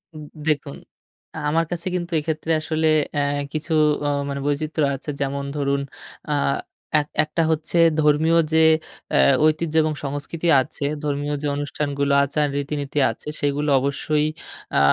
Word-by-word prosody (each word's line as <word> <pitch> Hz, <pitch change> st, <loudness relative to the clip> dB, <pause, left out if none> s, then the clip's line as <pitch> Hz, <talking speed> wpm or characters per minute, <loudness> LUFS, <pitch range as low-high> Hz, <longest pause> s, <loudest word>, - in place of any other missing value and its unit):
উম 155 Hz, -, -8 dB, 0.2 s
দেখুন 145 Hz, -2 st, -1 dB, 0.6 s
আ -, -, -6 dB
আমার 165 Hz, +2 st, +2 dB
কাছে 175 Hz, 0 st, -3 dB
কিন্তু 175 Hz, -1 st, -3 dB
এক্ষেত্রে 155 Hz, +1 st, -3 dB
আসলে 160 Hz, 0 st, 0 dB, 0.3 s
অ্যা 145 Hz, -, +2 dB, 0.3 s
কিছু 160 Hz, +1 st, -2 dB, 0.3 s
অ -, -, +2 dB, 0.2 s
মানে 140 Hz, 0 st, -3 dB
বৈচিত্র্য 150 Hz, +1 st, 0 dB
আছে 135 Hz, -, -8 dB
যেমন 140 Hz, 0 st, -1 dB
ধরুন, 140 Hz, -1 st, 0 dB, 0.5 s
আ -, -, +1 dB, 0.7 s
এক 145 Hz, -, -3 dB, 0.2 s
একটা 155 Hz, +2 st, -2 dB
হচ্ছে 160 Hz, +2 st, -1 dB, 0.2 s
ধর্মীয় 155 Hz, +2 st, +3 dB, 0.2 s
যে 160 Hz, 0 st, +5 dB, 0.5 s
অ্যা -, -, +4 dB, 0.2 s
ঐতিহ্য 155 Hz, +1 st, +1 dB
এবং 155 Hz, 0 st, 0 dB
সংস্কৃতি 145 Hz, +4 st, -3 dB
আছে, 145 Hz, +1 st, -5 dB, 0.2 s
ধর্মীয় 145 Hz, 0 st, -1 dB
যে 150 Hz, -, -1 dB
অনুষ্ঠানগুলো 140 Hz, -1 st, -1 dB
আচার, 145 Hz, +2 st, 0 dB
রীতিনীতি 145 Hz, 0 st, -2 dB
আছে 115 Hz, -, -12 dB
সেগুলো 145 Hz, +1 st, 0 dB
অবশ্যই 150 Hz, +2 st, 0 dB, 0.5 s
আ -, -, +6 dB
150 Hz, 145 wpm, -22 LUFS, 140-155 Hz, 0.7 s, আ